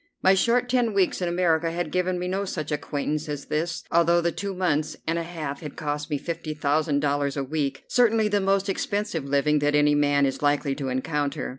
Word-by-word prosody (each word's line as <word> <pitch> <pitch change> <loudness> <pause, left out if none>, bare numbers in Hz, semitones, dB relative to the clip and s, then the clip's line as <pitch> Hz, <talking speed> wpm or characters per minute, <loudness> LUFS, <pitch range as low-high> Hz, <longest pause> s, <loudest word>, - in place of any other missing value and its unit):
My 190 - +6
short 240 +5 +2
ten 245 -3 +1
weeks 190 -1 +2
in 180 - 0
America 170 -2 +2
had 170 -2 -3
given 180 0 0
me 180 0 -3
no 190 +2 -1
such 155 -5 -4
acquaintance 150 +1 -2
as 145 -1 -4
this, 165 +2 -2
although 170 +1 +4
the 170 0 +1
two 200 +2 -4
months 155 -5 0
and 165 +1 0
a - - -1
half 155 -5 -5
had 150 -3 -7
cost 150 0 -3
me 150 - 0
fifty 165 0 -5
thousand 150 0 +1
dollars 145 -1 0
a 140 - 0
week, 140 0 -2
certainly 225 -3 +3
the 205 -1 +1
most 195 +1 +1
expensive 200 -4 -2
living 145 +2 +2
that 145 0 +1
any 150 0 +4
man 145 -1 +3
is 135 0 -2
likely 145 -1 +1
to 135 -1 -4
encounter. 145 +2 -2
155 Hz, 210 wpm, -25 LUFS, 145-180 Hz, -, My